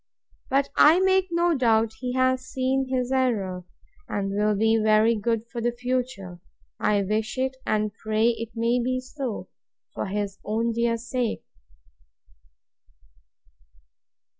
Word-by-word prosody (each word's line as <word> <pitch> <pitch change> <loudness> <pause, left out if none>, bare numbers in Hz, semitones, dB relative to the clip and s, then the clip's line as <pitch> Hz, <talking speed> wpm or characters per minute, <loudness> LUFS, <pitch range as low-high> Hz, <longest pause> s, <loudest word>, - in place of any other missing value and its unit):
—But 275 +1 +2
I 320 +4 +7
make 380 0 +3
no 340 0 +2
doubt 225 -4 +2
he 250 -1 -3
has 255 0 +2
seen 265 +1 0
his 255 -1 -1
error, 205 -9 0 0.4
and 195 -1 -2
will 210 +1 +1
be 225 +2 +3
very 215 +1 +4
good 225 +1 -1
for 235 - -4
the 240 +1 +1
future. 245 -7 -3 0.4
I 205 -1 +2
wish 215 +4 -2
it, 260 0 -1
and 215 -1 0
pray 220 +2 +1
it 230 -1 -3
may 235 +2 +1
be 255 +1 0
so, 255 -2 -5 0.5
for - - -3
his 200 0 -3
own 225 +2 0
dear 230 0 0
sake! 240 0 -3
235 Hz, 135 wpm, -25 LUFS, 215-255 Hz, 0.5 s, I